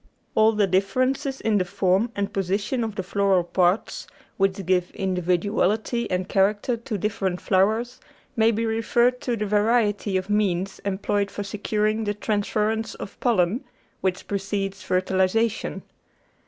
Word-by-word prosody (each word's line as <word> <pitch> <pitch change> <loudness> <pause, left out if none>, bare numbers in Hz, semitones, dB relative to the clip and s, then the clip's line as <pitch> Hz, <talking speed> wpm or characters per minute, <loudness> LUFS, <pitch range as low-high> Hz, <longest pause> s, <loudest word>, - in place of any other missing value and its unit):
All 220 +1 +4
the 210 -1 +3
differences 255 +8 0
in 215 -2 +1
the - - +2
form 195 +4 +1
and 200 0 -2
position 200 +6 -1
of 220 -2 -4
the 190 - -3
floral 195 -1 +2
parts, 180 +3 0 0.3
which 195 -1 0
give 180 0 +1
individuality 190 +5 0
and 180 0 -1
character 205 +5 +1
to 230 -1 -5
differ 205 0 -1
ent 180 -1 -2
flowers, 220 +6 +1 0.4
may 225 0 +4
be 230 0 0
referred 235 +3 +1
to 240 -2 -1
the 210 - -1
variety 210 -1 +2
of 185 0 -3
means 195 -3 0
employed 200 +1 0
for 205 - -5
securing 215 +2 -1
the 205 0 -1
transference 215 +1 -1
of 195 - -9
pollen, 225 +1 +1 0.4
which 185 -1 -1
precedes 195 0 -3
fertilisa 190 +4 +2
tion. 225 - -6
205 Hz, 145 wpm, -24 LUFS, 190-220 Hz, 0.4 s, All